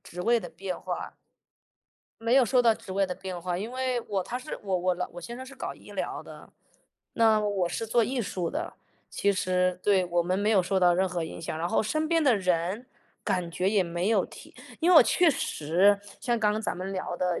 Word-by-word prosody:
职 180 +1 -7
位 235 +4 +3
的 - - -7
变 185 -2 -6
化。 - - -5 1.1
没 230 +2 +1
有 265 -1 +6
受 250 +1 +3
到 230 -2 +5
职 190 - -10
位 195 +1 +2
的 180 - -4
变 185 -1 -6
化， 175 0 -3
因 220 +5 -5
为 255 -2 -1
我 195 -3 -1
他 245 - -4
是 255 +4 -7
我 190 -2 0
我 180 0 0
老 180 - -3
我 175 - -8
先 235 +8 -7
生 260 - -7
是 270 - -11
搞 - - -5
医 - - -15
疗 - - -4
的， - - -12 0.7
那 220 -2 +4
我 200 -4 0
是 225 - -3
做 230 +1 +3
艺 255 +1 -2
术 180 -4 -3
的， 320 +4 -4 0.3
其 200 0 +1
实 180 -1 0
对， 195 -3 +3
我 175 0 +1
们 180 +2 -1
没 205 +2 +1
有 195 -4 +4
受 190 +2 0
到 175 -1 +5
任 185 +1 +1
何 175 -2 -2
影 160 - -8
响， 160 -1 -4
然 170 +1 -1
后 - - +2
身 310 +8 -1
边 330 0 +2
的 255 -7 +4
人 185 +5 -1 0.4
感 180 -2 -1
觉 180 +4 0
也 205 -3 +3
没 175 +3 -2
有 225 - +3
提。 - - -14 0.3
因 345 +3 +3
为 - - +7
我 - - +11
确 350 -3 +4
实 190 - +2 0.2
像 240 -1 0
刚 210 -1 +2
刚 215 - -2
咱 215 - -3
们 190 +2 -5
聊 185 -2 -4
的， 180 -1 -1
195 Hz, 255 characters per minute, -27 LUFS, 180-230 Hz, 1.1 s, 我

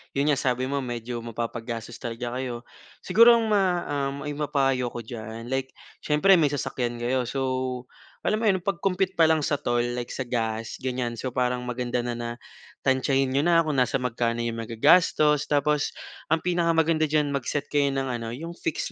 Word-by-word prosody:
'yon 145 +2 +2
nga 140 - +1
sabi 125 -1 0
mo 140 +2 -1
medyo 120 -1 -4
mapapagastos 115 0 -5
talaga 120 +1 -4
kayo. 120 -2 -4 0.4
Siguro 230 +5 +7
ang 225 -2 0
ma 185 -4 +2 0.2
um, 140 0 -5
maipapayo 140 -4 0
ko 120 0 -6
diyan, 115 +1 -7
like 130 0 -2 0.2
siyempre 175 +5 +4
may 155 - +4
sasakyan 125 -4 -2
kayo, 125 0 0
so 130 -1 -2 0.4
alam 215 - +1
mo 225 - +1
'yon 190 -3 +2
pag-compute 190 0 0
pa 165 - +7
lang 155 -2 +2
sa 145 -1 0
toll, 120 -4 +1
like 120 -1 -4
sa 130 - -3
gas 115 -2 -2
gan'yan, 125 -2 -2
so 130 +1 -3
parang 125 0 0
maganda 125 0 -2
na, 120 - -2
na 120 0 -4 0.5
tansyahin 135 0 +2
niyo 140 +2 +2
na 170 -1 +5
kung 155 -2 -2
nasa 125 +1 +2
magkano 120 -1 -1
'yong 115 -1 -3
magagastos. 150 +6 +3
Tapos 145 0 +1 0.4
ang 160 - +4
pinakamaganda 165 -2 +2
diyan 150 -1 +1
mag-set 140 +2 -2
kayo 145 -1 +3
ng 135 0 -1
ano 115 - -5
'yong 165 +5 -6
fix 330 - -2
130 Hz, 180 wpm, -26 LUFS, 120-150 Hz, 0.5 s, Siguro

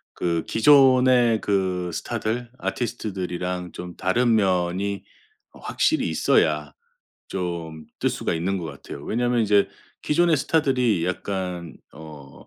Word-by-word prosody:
그 85 -2 -1
기존의 130 -3 +5
그 95 -3 -1
스타들, 120 +8 -3
아티스트들이랑 90 -6 -3
좀 90 -1 -8
다른 115 +5 +2
면이 95 0 0 0.5
어. - - -17
확실히 - - 0
있어야 - - +1 0.6
좀 85 -4 -5
뜰 - - +1
수가 - - -2
있는 90 +4 -1
것 85 - -6
같아요. 70 -1 -9
왜냐면 120 +1 0
이제 100 -1 +3 0.3
기존의 165 +1 +3
스타들이 125 - +1
약간 90 -2 -4 0.2
어. 75 -3 -13
95 Hz, 250 characters per minute, -23 LUFS, 90-120 Hz, 0.6 s, 기존의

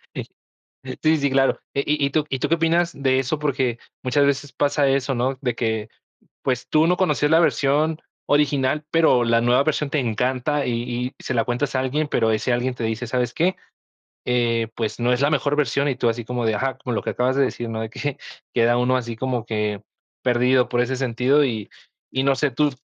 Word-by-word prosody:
Sí. - - -3 0.8
Sí, 155 0 +5
sí, 140 -2 0
claro. 135 0 +2 0.2
Eh, 140 - 0
¿y 145 -1 +1
y - - -2
tú 150 +1 +1
y 135 - -2
tú 145 - -1
qué 165 - +3
opinas 170 +1 +1
de 130 -1 +1
eso? 140 +4 -1
Porque 130 -5 -1 0.3
muchas 140 +3 +3
veces 140 0 -1
pasa 145 0 +1
eso, 135 0 +1
no 130 +2 -1
de 125 -4 -1
que 110 -2 -2 0.6
pues 125 -2 -1
tú 155 +1 +4
no 180 - +2
conocías 150 -4 +1
la 165 - +6
versión 155 0 +2 0.3
original, 145 0 +2
pero 160 -7 +4
la 115 0 +2
nueva 125 +3 +3
versión 150 -1 -1
te 150 - 0
encanta 130 +5 0
y 120 +1 -2
y - - -16
se 130 - -2
la 115 - +2
cuentas 125 +3 -2
a - - +2
alguien, 145 +4 -1
pero 115 -5 +1
ese 110 +3 0
alguien 125 +1 0
te 120 - -5
dice: 110 +2 -2
"¿Sabes 125 0 -1
qué?, 180 +3 +1 0.7
eh, 115 -2 +1
pues, 110 0 -3
no 120 +1 +2
es 125 - 0
la 145 +2 +3
mejor 145 0 +1
versión", 140 0 +1
y 135 - -1
tú 120 -2 +1
así 115 +1 -2
como 120 0 -2
de: 110 - +1
"Ajá", 135 +4 -2
como 125 -2 -4
lo - - -1
que - - -2
acabas 130 +2 0
de 140 - +3
decir, 120 -2 -4
¿no?, 110 0 -3
de 110 - -4
que, 140 +4 -4 0.4
queda 120 0 +3
uno 125 +1 +2
así 120 -2 -4
como 125 -2 -2
que 105 -2 -2 0.4
perdido 125 +1 +3
por 120 - 0
ese 130 +2 0
sentido 130 +3 +2
y 110 -6 -3 0.4
y 130 - 0
no 135 0 +3
sé, 145 0 +1
¿tú 145 +4 +1
130 Hz, 225 wpm, -22 LUFS, 120-145 Hz, 0.8 s, la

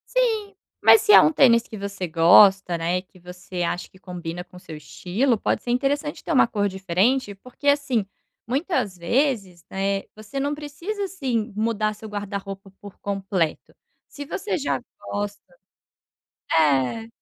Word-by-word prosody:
Sim, 440 -5 +1 0.3
mas 440 - +7
se 420 - +4
é - - +11
um 310 - +4
tênis 235 -6 +4
que 220 - -8
você 200 -2 -4
gosta, 175 +3 +6
né, 170 +2 0
que 185 0 -22
você 180 +1 -7
acha 175 +1 -2
que 190 - -21
combina 175 -2 -6
com 180 0 -16
o - - -11
seu 160 -3 -10
estilo, 190 - -1
pode - - -1
ser - - -8
interessante 285 +4 -1
ter - - -4
uma 270 - +5
cor 205 -3 0
diferente, 195 +5 0
porque 255 +7 -9
assim 285 -6 +2 0.4
muitas 265 - -1
vezes, 195 - 0
né, 195 +1 -1
você 215 +6 -6
não 285 +2 -1
precisa, 305 +8 -5
assim, 255 - -2
mudar 215 -1 0
seu 215 +1 -10
guarda-roupa 200 -1 -6
por 205 -1 -11
completo, 195 -5 -2 0.4
se 285 - -9
você 415 +8 -3
já 285 -4 -1 0.2
gosta 205 0 -4 1.1
é. 150 - +2
205 Hz, 155 wpm, -23 LUFS, 185-275 Hz, 1.1 s, é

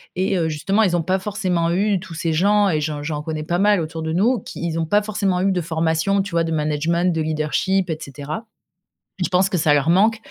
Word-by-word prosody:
et 190 +1 0
heu, 165 -2 0
justement 195 +8 +1
ils 180 -4 +2
ont 175 - +1
pas 185 +4 0
forcément 185 -4 -1
eu, 195 +2 +1
tous 185 -2 -10
ces 165 0 -2
gens 200 +4 +3
et 155 -4 0
j'en 150 -1 -3
j'en 150 -1 -3
connais 155 0 -4
pas 175 +2 -1
mal 205 -1 +4
autour 160 0 -4
de 160 0 -3
nous, 225 +8 +2
qui 170 - -7
ils 165 -1 -2
ont 165 - 0
pas 205 +6 +2
forcément 200 -3 -1
eu 195 - +2
de 180 -2 0
formation, 160 +4 0
tu 200 - -8
vois? 170 0 +1
De 165 - -3
management, 160 +3 0
de 160 - -1
leadership 160 +5 0
et 160 - -2
cetera. 145 - -7 0.8
Je - - -1
pense 185 +2 +2
que 185 - -1
ça 155 -2 +2
leur 145 +3 +2
manque 215 +5 +3
170 Hz, 245 wpm, -21 LUFS, 160-195 Hz, 0.8 s, mal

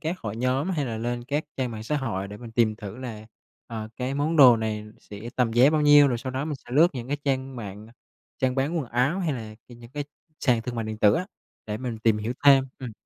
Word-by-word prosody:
các 170 +3 -3
hội 110 0 -5
nhóm 130 +8 0
hay 150 -6 -1
là 110 -2 -4
lên 120 +1 -3
các 145 +4 -1
trang 130 -2 -1
mạng 110 -1 -6
xã 150 +7 -1
hội 100 -8 -3
để 105 - -8
mình 115 +1 -10
tìm 110 -2 +2
thử 105 -1 -8
là, 110 -4 -7 0.4
ờ, 110 -2 -6
cái 130 +2 -2
món 155 +3 0
đồ 125 -5 +9
này 110 -1 -3 0.2
sẽ 105 -1 -11 0.2
tầm 120 -3 +2
giá 125 +5 +6
bao 155 -1 +2
nhiêu, 145 -1 +7
rồi 120 - -1
sau 130 +2 -5
đó 130 +3 -2
mình 155 -2 -3
sẽ - - -13
lướt 160 +5 +6
những 120 0 -6
cái 145 - 0
trang 135 -1 -1
mạng, 105 -1 -8 0.5
trang 130 -1 +1
bán 140 +6 0
quần 135 - -3
áo 130 +9 +1
hay 170 -5 0
là 110 -4 -6
cái 120 - -12
những 120 0 -14
cái 145 0 -4 0.4
sàn 120 -5 +2
thương 125 0 -5
mại 115 -1 -2
điện 110 0 -5
tử 105 -1 +5
á, 185 - -1 0.4
để 105 0 -3
mình 120 -3 -4
tìm 110 -1 +2
hiểu 110 +3 -2
thêm. 135 -2 +7
Ừm. 125 -4 -6
125 Hz, 260 wpm, -26 LUFS, 110-140 Hz, 0.5 s, đồ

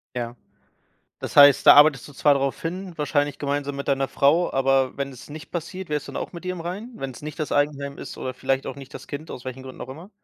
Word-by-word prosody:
Ja. 120 0 -4 0.8
Das - - -7
heißt, 145 -1 +8
da - - +11
arbeitest 145 -4 +6
du 145 - -12
zwar 145 +2 +4
drauf 135 -1 -1
hin, 180 +2 -5
wahrscheinlich 145 -1 0
gemeinsam 145 0 -2
mit 140 - -5
deiner 135 -1 +1
Frau, 160 +6 +3
aber 135 -1 +2
wenn 140 0 -3
es 125 - -13
nicht 150 +1 -9
passiert, 180 +2 -5
wärst 150 -1 -2
du - - -7
dann - - -4
auch - - -8
mit 170 0 -9
dir 185 - -2
im 180 - -7
Reinen? 195 +9 -6
Wenn's 135 -1 -6
nicht 150 +2 -7
das 155 - -3
Eigenheim 145 -1 0
ist - - -8
oder 130 - -4
vielleicht 135 +1 -1
auch - - -4
nicht 135 0 -11
das - - -9
Kind, 155 +2 -7
aus 125 - -8
welchen 130 0 -6
Gründen 130 -1 -11
auch - - -6
immer? 160 +9 -10
145 Hz, 250 wpm, -24 LUFS, 135-155 Hz, 0.8 s, da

